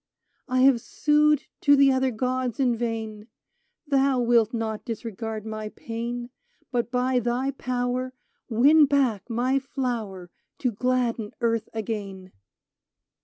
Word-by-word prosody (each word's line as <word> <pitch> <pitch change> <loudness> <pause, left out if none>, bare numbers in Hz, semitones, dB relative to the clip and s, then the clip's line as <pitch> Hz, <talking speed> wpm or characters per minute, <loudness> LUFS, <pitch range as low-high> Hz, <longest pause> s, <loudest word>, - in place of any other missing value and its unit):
I 255 -1 +1
have 260 -3 +5
sued 300 +1 +2 0.2
to 285 -1 +6
the 275 -1 +5
other 260 0 +2
gods 255 +1 -2
in 250 -3 +2
vain: 220 -2 -4 0.6
Thou 275 -2 +2
wilt 235 -2 +3
not 225 -2 -3
disregard 225 -2 -5
my 215 -1 -5
pain; 240 +2 -5 0.4
But 240 -2 -1
by 250 +1 +1
thy 245 +3 -1
power 255 -1 -2 0.4
Win 285 +6 +5
back 255 -7 +1
my 250 +4 +1
flower 230 -10 -4 0.3
To 250 - 0
gladden 235 -1 -1
earth 230 -2 0
again 200 -4 -5
240 Hz, 120 wpm, -25 LUFS, 225-260 Hz, 0.6 s, to